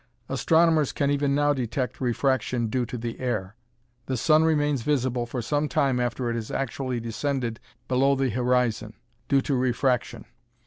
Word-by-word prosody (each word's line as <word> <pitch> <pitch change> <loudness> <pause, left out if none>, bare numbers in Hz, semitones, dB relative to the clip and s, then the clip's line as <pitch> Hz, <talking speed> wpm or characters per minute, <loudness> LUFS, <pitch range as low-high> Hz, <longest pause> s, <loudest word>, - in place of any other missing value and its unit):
Astronomers 160 -3 +3
can 140 0 +1
even 140 -1 +1
now 145 0 +3
detect 125 0 -3
refraction 125 -1 0
due 125 +1 -1
to 125 - -5
the 115 0 -5
air. 110 -6 -2 0.5
The 130 - -1
sun 155 +6 +4
remains 150 -4 +2
visible 125 -3 0
for 120 0 -4
some 145 +4 0
time 135 -3 +1
after 120 0 -1
it - - -2
has 115 -2 -4
actually 130 -1 -2
descended 115 0 -3 0.3
below 135 +2 +3
the 135 -2 0
horizon, 120 -2 0 0.3
due 135 -1 +3
to 140 - -2
refraction. 125 -1 0
130 Hz, 160 wpm, -25 LUFS, 120-140 Hz, 0.5 s, sun